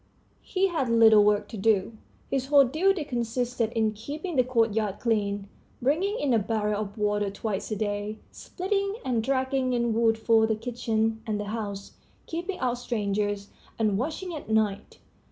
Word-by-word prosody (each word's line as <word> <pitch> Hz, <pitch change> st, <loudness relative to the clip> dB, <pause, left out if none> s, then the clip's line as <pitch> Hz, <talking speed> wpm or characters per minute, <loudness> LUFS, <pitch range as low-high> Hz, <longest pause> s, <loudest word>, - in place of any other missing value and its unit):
He 385 Hz, 0 st, 0 dB
had 295 Hz, -8 st, -1 dB
little 220 Hz, -2 st, +7 dB
work 205 Hz, 0 st, +2 dB
to 220 Hz, -, -7 dB
do; 205 Hz, +1 st, +1 dB, 0.4 s
his 265 Hz, -1 st, 0 dB
whole 280 Hz, -1 st, +6 dB
duty 335 Hz, +6 st, +1 dB
consisted 240 Hz, -2 st, -1 dB
in 220 Hz, -1 st, +2 dB
keeping 295 Hz, -, -6 dB
the 255 Hz, -, +4 dB
courtyard 225 Hz, -5 st, +1 dB
clean, 205 Hz, -3 st, 0 dB, 0.3 s
bringing 355 Hz, -, +1 dB
in 275 Hz, -4 st, +1 dB
a 230 Hz, -, +4 dB
barrel 210 Hz, 0 st, -1 dB
of 205 Hz, 0 st, -6 dB
water 205 Hz, -1 st, 0 dB
twice 200 Hz, 0 st, -4 dB
a 215 Hz, -, -1 dB
day, 205 Hz, 0 st, -3 dB
splitting 395 Hz, +2 st, -2 dB
and 245 Hz, -3 st, +1 dB
dragging 260 Hz, +1 st, 0 dB
in 235 Hz, -1 st, +1 dB
wood 225 Hz, 0 st, +3 dB
for 220 Hz, 0 st, +3 dB
the 220 Hz, -, +1 dB
kitchen 225 Hz, -1 st, -1 dB
and 210 Hz, -1 st, -1 dB
the -, -, -2 dB
house, 200 Hz, -3 st, -5 dB, 0.3 s
keeping 350 Hz, +3 st, -4 dB
out 245 Hz, -1 st, -1 dB
strangers, 205 Hz, -3 st, -2 dB, 0.3 s
and 215 Hz, -3 st, +1 dB
watching 325 Hz, +7 st, -3 dB
at 300 Hz, -7 st, -7 dB
night. 215 Hz, -2 st, 0 dB
225 Hz, 165 wpm, -27 LUFS, 210-260 Hz, 0.4 s, little